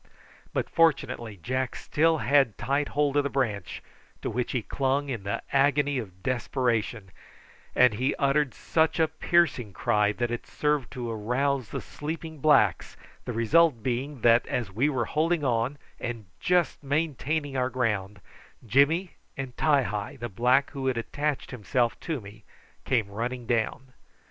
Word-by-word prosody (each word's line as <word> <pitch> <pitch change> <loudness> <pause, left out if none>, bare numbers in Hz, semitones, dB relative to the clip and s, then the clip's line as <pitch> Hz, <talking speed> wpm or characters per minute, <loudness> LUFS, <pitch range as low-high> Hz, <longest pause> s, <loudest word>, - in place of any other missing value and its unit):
But - - -1
fortunately 135 -9 +1
Jack 130 0 -1
still 160 +2 +2
had 135 -3 +3
tight 140 +2 0
hold 145 -1 +1
of 145 - +4
the 140 - -1
branch, 110 - -2 0.4
to - - -2
which 125 +2 -2
he 125 -4 -1
clung 140 +3 -1
in 120 -6 -3
the 100 +1 -3
agony 140 0 +3
of 95 -5 -9
desperation, 120 -5 -1 0.6
and 125 -3 +6
he 130 +6 0
uttered 140 -1 +1
such 160 +1 +1
a 160 - +4
piercing 150 - +1
cry 105 -2 +2
that 120 +2 -2
it 120 - -4
served 150 -4 0
to 120 -3 -4
arouse 125 +3 -1
the - - -4
sleeping 160 +1 -6
blacks, 130 - +3 0.3
the 125 - -3
result 120 +2 +3
being 130 +2 -2
that, 115 +1 +5
as 115 -6 -2
we 125 +10 +1
were 125 -5 0
holding 160 +3 0
on, 125 +2 0 0.2
and 120 -3 -5
just 180 -2 +1
maintaining 145 0 -1
our 130 -1 +1
ground, 105 -6 -2 0.4
Jimmy 140 - +2 0.2
and 130 -2 -5
Ti 145 -3 +3
hi, 105 +1 -4
the 120 0 -4
black 125 +7 +2
who 135 -2 -4
had 130 -2 +1
attached 145 +5 -2
himself 120 0 0
to 160 -5 -3
me, 105 0 -13 0.4
came 120 -6 +1
running 120 +4 -4
down. 120 +3 -1
130 Hz, 155 wpm, -27 LUFS, 115-145 Hz, 0.6 s, and